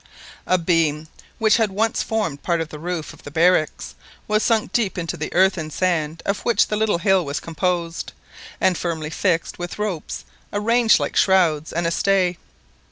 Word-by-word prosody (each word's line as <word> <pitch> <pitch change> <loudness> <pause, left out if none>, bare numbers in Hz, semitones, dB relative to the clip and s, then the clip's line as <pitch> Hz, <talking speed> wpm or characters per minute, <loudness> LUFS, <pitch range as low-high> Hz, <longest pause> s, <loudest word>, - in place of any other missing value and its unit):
A 185 - +4
beam, 165 -3 +1 0.3
which 220 -1 +4
had 225 -3 +2
once 215 +3 0
formed 210 -11 -2
part 170 -2 0
of 165 -1 -3
the 150 - -9
roof 170 -1 -4
of - - -16
the - - -9
barracks, 165 +1 +1 0.3
was 215 0 +2
sunk 225 -2 +1
deep 215 -6 0
into 170 -2 -3
the - - -5
earth 190 0 +3
and 155 -1 -5
sand 165 -3 -1
of 200 0 0
which 235 - +2
the 210 - 0
little 215 -3 +1
hill 190 +1 +3
was 140 -1 -3
composed, 170 0 -2 0.5
and 185 - +3
firmly 160 -3 -3
fixed 170 0 -1
with 175 0 -5
ropes 205 -7 -4 0.3
arranged 230 +3 +3
like - - -3
shrouds 170 -6 +3
and 170 +1 -1
a 165 - +1
stay. 185 -1 +1
180 Hz, 180 wpm, -22 LUFS, 165-205 Hz, 0.5 s, A